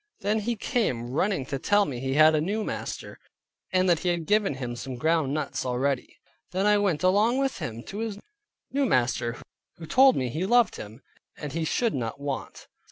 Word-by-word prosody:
Then 210 Hz, +2 st, +1 dB
he 235 Hz, +3 st, -1 dB
came 130 Hz, -, -1 dB
running 160 Hz, 0 st, 0 dB
to 135 Hz, 0 st, -4 dB
tell 205 Hz, +8 st, +3 dB
me 130 Hz, -4 st, -5 dB
he 135 Hz, +1 st, -2 dB
had 155 Hz, +1 st, +7 dB
a 155 Hz, -, +2 dB
new 205 Hz, +7 st, -1 dB
master, -, -, -5 dB, 0.5 s
and 185 Hz, 0 st, +2 dB
that 170 Hz, -3 st, +3 dB
he 180 Hz, -, -1 dB
had 170 Hz, -2 st, -1 dB
given 210 Hz, -4 st, +2 dB
him 125 Hz, -2 st, -5 dB
some 130 Hz, +1 st, -6 dB
ground 160 Hz, +1 st, +1 dB
nuts 150 Hz, -1 st, -2 dB
already. 130 Hz, +1 st, -1 dB, 0.3 s
Then 190 Hz, +2 st, -1 dB
I 210 Hz, 0 st, +4 dB
went 185 Hz, -6 st, 0 dB
along 210 Hz, +7 st, +3 dB
with 270 Hz, -1 st, -1 dB
him 115 Hz, 0 st, -5 dB
to 205 Hz, -, -7 dB
his 220 Hz, -3 st, -3 dB, 0.5 s
new 280 Hz, -1 st, +1 dB
master 120 Hz, -, +1 dB, 0.4 s
who 165 Hz, -, -8 dB
told 260 Hz, -, +5 dB
me 130 Hz, -1 st, -1 dB
he 155 Hz, +8 st, -3 dB
loved 240 Hz, -2 st, +3 dB
him, 110 Hz, +5 st, -10 dB, 0.3 s
and 150 Hz, -2 st, -6 dB
he 165 Hz, 0 st, -1 dB
should 230 Hz, +7 st, +1 dB
not 125 Hz, +1 st, -3 dB
want. 140 Hz, -1 st, -5 dB
160 Hz, 200 wpm, -26 LUFS, 130-205 Hz, 0.5 s, had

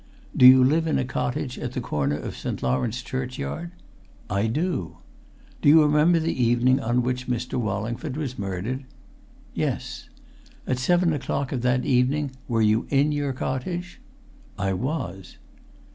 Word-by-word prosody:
"Do 125 Hz, -, +8 dB
you 130 Hz, 0 st, +8 dB
live 160 Hz, +5 st, +2 dB
in 160 Hz, -, +1 dB
a 135 Hz, -, 0 dB
cottage 125 Hz, 0 st, -3 dB
at 125 Hz, -, -4 dB
the -, -, -2 dB
corner 75 Hz, -, -1 dB
of -, -, -6 dB
St. -, -, -5 dB
Lawrence 115 Hz, -, -1 dB
churchyard?" 130 Hz, -, -4 dB, 0.6 s
"I 100 Hz, +3 st, +1 dB
do!" 145 Hz, -, -2 dB, 0.6 s
"Do -, -, +5 dB
you 155 Hz, +1 st, +8 dB
remember 150 Hz, +3 st, +4 dB
the 165 Hz, +1 st, -1 dB
evening 125 Hz, +2 st, +3 dB
on 125 Hz, -1 st, 0 dB
which 125 Hz, 0 st, -2 dB
Mr. 125 Hz, 0 st, -3 dB
Wallingford 115 Hz, +6 st, -3 dB
was 135 Hz, -6 st, -4 dB
murdered?" 100 Hz, +7 st, -3 dB, 0.7 s
"Yes." -, -, -3 dB, 0.6 s
"At 130 Hz, -, -1 dB
seven 175 Hz, +4 st, +2 dB
o'clock 140 Hz, -1 st, -2 dB
of 130 Hz, -, -2 dB
that 125 Hz, +1 st, +1 dB
evening 135 Hz, +2 st, +1 dB, 0.2 s
were 115 Hz, -2 st, +1 dB
you 110 Hz, +2 st, +2 dB
in 145 Hz, +2 st, +3 dB
your 145 Hz, -2 st, -1 dB
cottage?" 170 Hz, +8 st, -4 dB, 0.6 s
"I 95 Hz, 0 st, 0 dB
was!" 95 Hz, -, -4 dB
125 Hz, 150 wpm, -25 LUFS, 115-145 Hz, 0.7 s, Do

